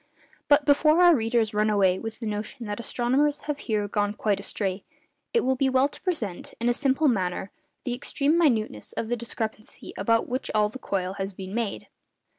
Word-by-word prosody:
But 290 0 +5
before 305 +3 +4
our 350 -2 +7
readers 225 -2 +1
run 210 +1 +2
away 190 -3 +3
with 225 -1 -6
the 235 - -5
notion 215 +3 -4
that 205 0 -4
astronomers 260 +6 +1
have 295 -1 -4
here 210 -3 -1
gone 205 0 -1
quite 205 -2 0
astray, 195 -1 -2 0.5
it 470 - +3
will 260 0 +1
be 265 +1 +2
well 260 +1 +3
to 290 - -13
present, 230 - -3
in 235 - 0
a 240 - +4
simple 275 +3 +2
manner, 190 -5 0 0.3
the 245 - -2
extreme 280 +4 0
minuteness 225 - +1
of 225 - -3
the 240 - +1
discrepancy 220 -2 -6
about 230 0 +2
which 255 +2 -3
all 210 -1 +3
the 260 - -9
coil 190 -5 -2
has 195 +1 -3
been 190 +1 -8
made. 230 -2 -3
230 Hz, 195 wpm, -26 LUFS, 205-270 Hz, 0.5 s, our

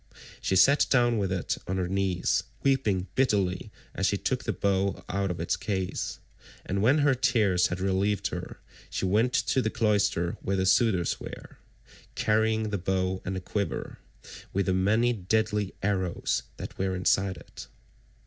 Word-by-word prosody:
She 95 - 0
sat 140 +11 +5
down 120 -3 +3
with 95 -2 -1
it 95 -2 -2
on 95 +1 -1
her 90 -1 -1
knees, 95 -1 +1 0.2
weeping 110 -9 +2
bitterly 100 -8 +1 0.2
as - - 0
she - - +1
took - - -2
the - - 0
bow 100 0 0
out 100 +1 -1
of 90 - -4
its 85 - 0
case, 95 -3 -3 0.5
and 95 +1 -1
when 130 +8 +4
her 145 - +5
tears 115 -8 +2
had 90 - -4
relieved 95 +1 0
her, - - -7 0.3
she - - -2
went 110 +6 +2
to 130 - +2
the 110 - 0
cloister 100 -6 +1
where 95 - -1
the 95 - +1
suitors 95 -3 +2
were, - - -10 0.6
carrying 110 0 +1
the 100 - -1
bow 95 0 -1
and 95 - -3
the 95 - -4
quiver, 100 +2 -3 0.5
with 100 0 +1
the 95 - +1
many 110 +6 +2
deadly 105 0 -1
arrows 95 -3 0 0.2
that - - -8
were 95 0 0
inside 95 +1 +1
it. - - -11
100 Hz, 165 wpm, -28 LUFS, 95-110 Hz, 0.6 s, sat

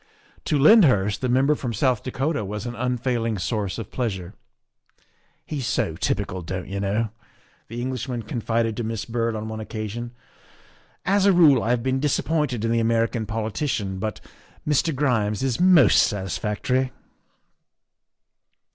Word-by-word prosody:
To 150 - +1
Lyndhurst 135 - +5
the 130 - 0
Member 135 +4 +3
from 125 -5 -4
South 125 +1 +1
Dakota 135 +2 -2
was 105 +3 -5
an 120 - -4
unfailing 120 -2 -1
source 100 0 -2
of 115 -4 -7
pleasure. 95 -8 -3 0.6
" - - -38 0.3
He's 140 -5 -4
so - - 0
typical, 90 0 -2
don't 90 +2 -5
you 100 0 -4
know," 105 +3 0 0.6
the 115 +2 -6
Englishman 125 -2 -3
confided 115 0 -1
to 120 - -2
Miss 110 -1 -3
Byrd 115 -1 -1
on 110 0 -4
one 110 0 -5
occasion; 110 +2 -5 0.5
" - - -31
as 200 0 +3
a - - +7
rule 155 -9 +6
I - - -2
have 120 -1 +1
been 130 0 0
disappointed 145 -4 0
in 115 - 0
the 115 - +2
American 115 0 0
politician, 110 -2 -2
but 110 +1 -3 0.5
Mr. 150 +2 +2
Grimes 120 -5 0
is 130 -3 0
most 180 - +6
satisfactory." 105 +6 -1
115 Hz, 150 wpm, -24 LUFS, 105-130 Hz, 0.6 s, a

